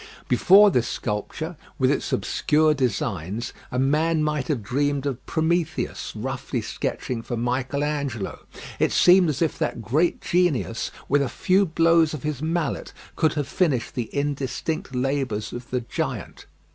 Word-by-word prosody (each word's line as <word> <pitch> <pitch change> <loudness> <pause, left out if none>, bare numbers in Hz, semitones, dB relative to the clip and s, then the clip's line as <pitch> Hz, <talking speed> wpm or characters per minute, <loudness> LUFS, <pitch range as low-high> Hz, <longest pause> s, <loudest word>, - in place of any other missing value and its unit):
Before 200 +2 +6
this 120 -5 +1
sculpture, 105 -3 -4 0.2
with - - +3
its - - -1
obscure 155 +1 +2
designs, 115 - -2 0.2
a 125 - -3
man 155 +4 +2
might 150 -4 -1
have 130 -8 -1
dreamed 140 +5 0
of 135 -3 -3
Prometheus 160 0 -1
roughly 130 +2 -3
sketching 115 +2 -3
for 120 +1 -4
Michael 125 +4 -1
Angelo. 140 -9 -3 0.4
It - - +2
seemed 180 -1 +6
as 150 +3 0
if 160 - -2
that 150 -7 -2
great 155 - +1
genius 165 -10 0 0.2
with 145 +1 +3
a 135 - 0
few 190 +7 +2
blows 165 -1 +3
of 145 - -8
his 150 -3 -3
mallet 160 -1 -2 0.2
could 160 -2 +2
have 145 -3 -1
finished 145 -11 0
the 120 -4 -3
indistinct 145 +3 -2
labours 130 -5 -1
of 120 0 -7
the 125 -1 -1
giant. 115 - -5
140 Hz, 150 wpm, -24 LUFS, 125-160 Hz, 0.4 s, Before